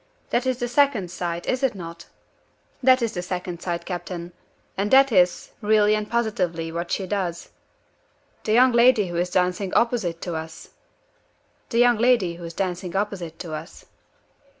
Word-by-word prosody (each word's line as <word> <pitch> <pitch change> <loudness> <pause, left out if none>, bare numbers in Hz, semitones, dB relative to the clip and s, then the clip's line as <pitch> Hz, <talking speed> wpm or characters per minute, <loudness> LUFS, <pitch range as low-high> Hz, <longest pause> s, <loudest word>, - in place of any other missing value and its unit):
That 250 +2 +1
is 255 -2 0
the 245 - -2
Second 245 -8 +2
Sight, 175 -1 -4
is 255 +1 -1
it 265 -5 +1
not?" 170 -2 -9 0.7
"That 255 -1 +5
is 230 - 0
the 180 - -3
Second 180 -1 -5
Sight, 170 -2 -3
captain. 175 -1 -5 0.4
And 200 +2 -1
that 270 +1 +6
is, 180 -4 +2
really 210 0 +4
and 215 0 -2
positively, 180 -8 -1
what 170 +1 -4
she 195 - -1
does." 185 -3 -3 0.9
"The 215 - 0
young 250 +2 +6
lady 235 -4 +4
who 175 - -4
is 175 +1 0
dancing 180 +1 0
opposite 220 -9 +1
to 175 - -4
us?" 160 0 -7 1.0
"The 230 - -2
young 240 -2 +5
lady 225 -8 +2
who 175 - -8
is 165 0 -8
dancing 180 -1 -3
opposite 190 -5 -3
to 165 -3 -7
us." 155 - -8
190 Hz, 170 wpm, -24 LUFS, 175-235 Hz, 1.0 s, that